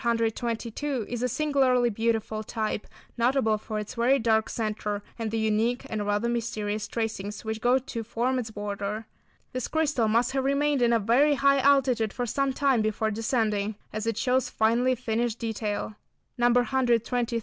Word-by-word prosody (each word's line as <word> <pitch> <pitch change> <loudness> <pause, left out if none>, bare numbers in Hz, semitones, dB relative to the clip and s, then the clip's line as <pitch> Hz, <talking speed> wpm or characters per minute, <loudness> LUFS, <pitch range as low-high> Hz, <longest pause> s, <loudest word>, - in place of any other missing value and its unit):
122 235 +2 -1
is 240 -1 -4
a 250 - +2
singularly 255 -3 +2
beautiful 220 0 -1
type, 215 -1 -3 0.3
notable 235 -3 +2
for 215 0 -5
its 210 -1 -5
very 245 +3 +3
dark 220 -2 +2
centre, 210 -2 -3 0.2
and 225 -1 -2
the 225 - -2
unique 220 +3 +1
and 210 -2 -2
rather 205 +3 +1
mysterious 215 -3 -2
tracings 215 -1 -4
which 220 0 -3
go 245 +2 +4
to 245 -3 -5
form 240 +3 -1
its 230 -3 -4
border. 205 +1 -4 0.5
This 255 -1 -2
crystal 300 -8 +1
must 235 +3 +2
have 265 0 0
remained 280 0 +1
in 240 -1 +4
a 235 - +5
very 250 +8 +3
high 275 0 +4
altitude 260 -6 +3
for 245 - -2
some 275 +4 0
time 265 -3 +2
before 215 0 0
descending 215 -2 0 0.2
as 215 +1 -3
it 225 -2 -1
shows 255 0 +1
finely 235 +4 +2
finished 230 0 -1
detail. 215 -2 -3 0.5
[Illustration: 245 +2 +3
102. 245 -2 +4
A - - +2
feathery 245 -1 0
type. 235 0 -1
230 Hz, 175 wpm, -27 LUFS, 220-250 Hz, 0.5 s, a